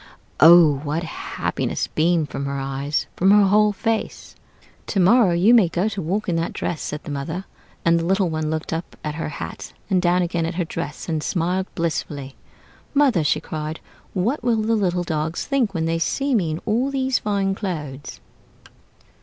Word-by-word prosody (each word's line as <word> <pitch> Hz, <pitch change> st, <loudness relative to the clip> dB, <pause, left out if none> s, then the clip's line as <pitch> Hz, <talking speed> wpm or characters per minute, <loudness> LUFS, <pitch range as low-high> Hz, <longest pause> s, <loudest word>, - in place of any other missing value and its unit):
Oh! 160 Hz, -3 st, +8 dB
what 150 Hz, +4 st, -3 dB
happiness 165 Hz, -, -3 dB
beamed 160 Hz, -1 st, +1 dB
from 140 Hz, -, -4 dB
her 140 Hz, 0 st, -3 dB
eyes, 135 Hz, +2 st, -2 dB
from 190 Hz, -, +3 dB
her 205 Hz, +1 st, +7 dB
whole 210 Hz, +2 st, +4 dB
face. 220 Hz, +2 st, -3 dB, 0.5 s
'To 200 Hz, -, -1 dB
morrow 195 Hz, +2 st, +5 dB
you 180 Hz, +7 st, +4 dB
may 215 Hz, -8 st, +5 dB
go 180 Hz, +4 st, 0 dB
to 195 Hz, -2 st, -4 dB
walk 195 Hz, +7 st, -2 dB
in 170 Hz, -2 st, 0 dB
the 165 Hz, -, -1 dB
dress,' 165 Hz, -, -4 dB
said 150 Hz, 0 st, -5 dB
the -, -, -7 dB
mother; 160 Hz, +7 st, -4 dB, 0.4 s
and 170 Hz, 0 st, +4 dB
the 165 Hz, -, -2 dB
little 190 Hz, +1 st, +2 dB
one 155 Hz, -1 st, -2 dB
looked 160 Hz, +1 st, -3 dB
up 165 Hz, +2 st, -5 dB
at 150 Hz, -, -3 dB
her 160 Hz, 0 st, -4 dB
hat 150 Hz, -, -7 dB, 0.2 s
and 185 Hz, -1 st, +3 dB
down 180 Hz, 0 st, +2 dB
again 170 Hz, -1 st, -1 dB
at 165 Hz, -, -4 dB
her 175 Hz, -1 st, -1 dB
dress, 150 Hz, -2 st, -6 dB
and 160 Hz, -2 st, -1 dB
smiled 180 Hz, +3 st, -1 dB
blissfully. 145 Hz, -5 st, -3 dB, 0.6 s
'Mother,' 270 Hz, -, +4 dB
she 150 Hz, -, +2 dB
cried, 155 Hz, 0 st, -5 dB, 0.3 s
'what 220 Hz, +10 st, -1 dB
will 235 Hz, -2 st, +2 dB
the 225 Hz, +1 st, +1 dB
little 180 Hz, -4 st, 0 dB
dogs 160 Hz, -1 st, -2 dB
think 245 Hz, -8 st, 0 dB
when 160 Hz, -1 st, 0 dB
they 165 Hz, 0 st, 0 dB
see 275 Hz, +10 st, 0 dB
me 185 Hz, -9 st, +2 dB
in 155 Hz, +2 st, -4 dB
all 240 Hz, +5 st, +1 dB
these 265 Hz, -1 st, 0 dB
fine 200 Hz, -2 st, 0 dB
clothes?'" 150 Hz, -9 st, -5 dB
175 Hz, 185 wpm, -22 LUFS, 155-200 Hz, 0.6 s, Oh